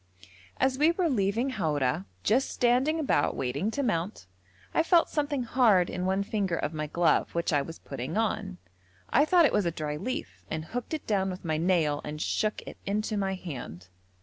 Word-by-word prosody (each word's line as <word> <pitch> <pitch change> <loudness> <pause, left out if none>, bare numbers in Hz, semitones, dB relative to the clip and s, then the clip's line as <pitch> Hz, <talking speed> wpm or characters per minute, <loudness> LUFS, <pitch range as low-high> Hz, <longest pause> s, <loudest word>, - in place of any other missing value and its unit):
As 260 0 +2
we 305 +2 +5
were 345 0 0
leaving 225 +3 +1
Haura, 145 - 0 0.2
just 255 +5 +2
standing 255 +6 +2
about 270 - +1
waiting 135 - -1
to 280 +5 -2
mount, 175 - -2 0.5
I - - +4
felt 335 +1 +4
something 290 -3 0
hard 225 -7 +3
in 180 0 -2
one 190 +1 +1
finger 200 -4 -1
of 155 -1 -2
my 155 -1 -3
glove 170 +2 +1
which 170 -1 0
I 145 - +3
was 165 +4 -7
putting 135 - -5
on. 210 -4 -1 0.5
I 290 +4 +5
thought 345 0 +5
it - - +2
was 205 -4 +2
a - - +3
dry 150 -2 -4
leaf 95 - -5
and 155 0 -3
hooked 245 - -4
it 310 - -7
down 195 -3 +1
with 185 -1 -7
my 155 -1 0
nail 160 -4 +1
and 150 0 -6
shook 215 +6 -1
it - - -10
into 215 +2 -1
my 195 -1 0
hand. 120 - -8
190 Hz, 195 wpm, -28 LUFS, 155-245 Hz, 0.5 s, we